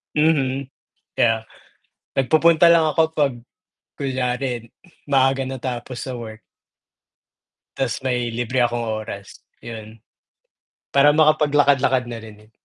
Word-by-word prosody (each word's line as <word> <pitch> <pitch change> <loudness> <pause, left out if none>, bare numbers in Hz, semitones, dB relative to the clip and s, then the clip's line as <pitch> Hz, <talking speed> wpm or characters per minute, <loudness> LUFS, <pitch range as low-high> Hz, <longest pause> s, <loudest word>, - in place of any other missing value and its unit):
Mhm. 140 -3 +1 0.4
Yeah. 115 -1 +1 0.7
Nagpupunta 160 +5 +4
lang 170 -1 +6
ako 160 - +3
'pag 140 -4 +2 0.7
kunyare 125 -3 -2 0.4
maaga 135 0 +3
natapos 125 -1 -5
sa 130 -2 -5
work. 110 -2 -8 1.4
Tas - - -2
may 125 -2 -1
libre 120 +2 0
akong 120 -1 -1
oras, 110 -2 -6 0.2
yun. 110 -1 -10 0.9
Para 145 +2 +5
makapaglakad-lakad 145 -4 +3
na 115 - -6
rin 110 -2 -12
eh. - - -31
130 Hz, 105 wpm, -21 LUFS, 120-140 Hz, 1.4 s, lang